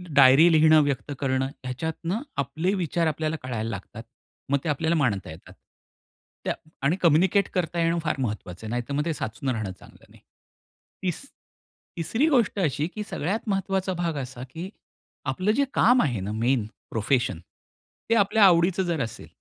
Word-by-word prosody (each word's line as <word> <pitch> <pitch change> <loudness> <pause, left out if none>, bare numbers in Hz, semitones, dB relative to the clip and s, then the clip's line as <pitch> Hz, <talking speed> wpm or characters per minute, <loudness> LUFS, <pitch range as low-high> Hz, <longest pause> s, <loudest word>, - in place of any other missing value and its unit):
Diary 140 +5 +7
लिहिणं, 155 0 +6
व्यक्त 145 0 -2
करणं 130 -1 0
ह्याच्यातनं 160 - -4 0.2
आपले 155 +8 -1
विचार 170 -2 0
आपल्याला 155 0 -1
कळायला 115 -3 -3
लागतात. 110 +2 -7 0.5
मग 140 - +3
ते 160 - -2
आपल्याला 160 +3 +1
मांडता 110 - 0
येतात. 80 +3 -13 0.9
त्या - - +1 0.3
आणि 140 +6 +2
कम्युनिकेट 180 +4 +4
करता 175 -2 -1
येणं, 165 +1 +2
फार 155 - 0
महत्वाचं 105 -4 -4
आहे. - - -5
नाहीतर 120 +3 -3
मग 150 +4 0
साचून 125 +2 -4
राहणं 110 -6 -2
चांगलं - - -17
नाही. - - -19 0.8
तिस 180 -3 -2 0.8
तिसरी 225 - +1
गोष्ट 235 -8 +2
अशी, 150 -2 0
की 210 +3 -6
सगळ्यात 195 +9 -1
महत्वाचा 195 -1 0
भाग 170 -2 -2
असा, 125 -2 -6
की 170 +6 -6 0.6
आपलं 185 +10 0
जे 280 - +3
काम 245 +2 +5
आहे 125 - 0
ना 95 +2 -4
मेन 115 +1 +1 0.3
प्रोफेशन, 110 -4 0 0.7
ते 230 - +4
आपल्या 210 0 +4
आवडीचं 180 +1 +4
जर 170 -5 -1
असेल 115 - -7
155 Hz, 160 wpm, -25 LUFS, 125-180 Hz, 0.9 s, Diary